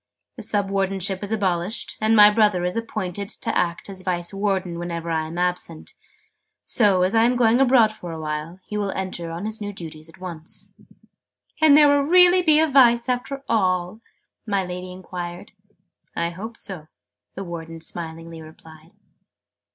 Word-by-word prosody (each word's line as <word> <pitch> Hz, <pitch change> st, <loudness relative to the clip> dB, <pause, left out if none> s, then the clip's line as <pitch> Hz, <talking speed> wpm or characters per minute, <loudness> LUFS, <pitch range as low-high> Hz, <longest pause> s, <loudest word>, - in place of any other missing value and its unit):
"The -, -, -8 dB
Sub 200 Hz, -2 st, -1 dB
Wardenship 195 Hz, -1 st, -1 dB
is 205 Hz, 0 st, -5 dB
abolished, 190 Hz, -1 st, -1 dB
and 220 Hz, +1 st, +3 dB
my 210 Hz, -1 st, +8 dB
brother 210 Hz, -5 st, +2 dB
is 180 Hz, -, -2 dB
appointed 205 Hz, -4 st, -4 dB
to -, -, -3 dB
act 170 Hz, -1 st, -1 dB
as 195 Hz, -2 st, -7 dB
Vice 175 Hz, -1 st, -1 dB
Warden 190 Hz, -3 st, -1 dB
whenever 170 Hz, -1 st, -4 dB
I 160 Hz, -1 st, -1 dB
am 165 Hz, +2 st, -8 dB
absent. 180 Hz, -, -3 dB, 0.7 s
So, 200 Hz, -6 st, +2 dB
as 185 Hz, +3 st, +1 dB
I 225 Hz, -, +4 dB
am 245 Hz, +2 st, +3 dB
going 240 Hz, +1 st, +3 dB
abroad 245 Hz, -4 st, +5 dB
for 180 Hz, -5 st, -9 dB
a 160 Hz, -, -6 dB
while, 155 Hz, +3 st, -5 dB
he 210 Hz, -, -5 dB
will 205 Hz, -1 st, -1 dB
enter 185 Hz, -3 st, -4 dB
on 170 Hz, +4 st, -5 dB
his 220 Hz, +1 st, -4 dB
new 205 Hz, 0 st, -4 dB
duties 160 Hz, -4 st, -8 dB
at 165 Hz, -, -18 dB
once." 170 Hz, -3 st, -8 dB, 0.9 s
"And 300 Hz, -2 st, +7 dB
there 300 Hz, -1 st, +7 dB
will 285 Hz, 0 st, +4 dB
really 360 Hz, +4 st, +6 dB
be 310 Hz, -3 st, +4 dB
a 320 Hz, -, +4 dB
Vice 245 Hz, -4 st, +5 dB
after 265 Hz, +2 st, -3 dB
all?" 185 Hz, -1 st, 0 dB, 0.5 s
my 200 Hz, -2 st, 0 dB
Lady 180 Hz, 0 st, -6 dB
enquired. 180 Hz, -1 st, -7 dB, 0.6 s
"I 170 Hz, 0 st, -1 dB
hope 220 Hz, +6 st, -8 dB
so!" 175 Hz, -6 st, -5 dB, 0.5 s
the 195 Hz, -, -5 dB
Warden 165 Hz, -2 st, -7 dB
smilingly 165 Hz, 0 st, -8 dB
replied. 160 Hz, +1 st, -15 dB
190 Hz, 170 wpm, -23 LUFS, 170-220 Hz, 0.9 s, my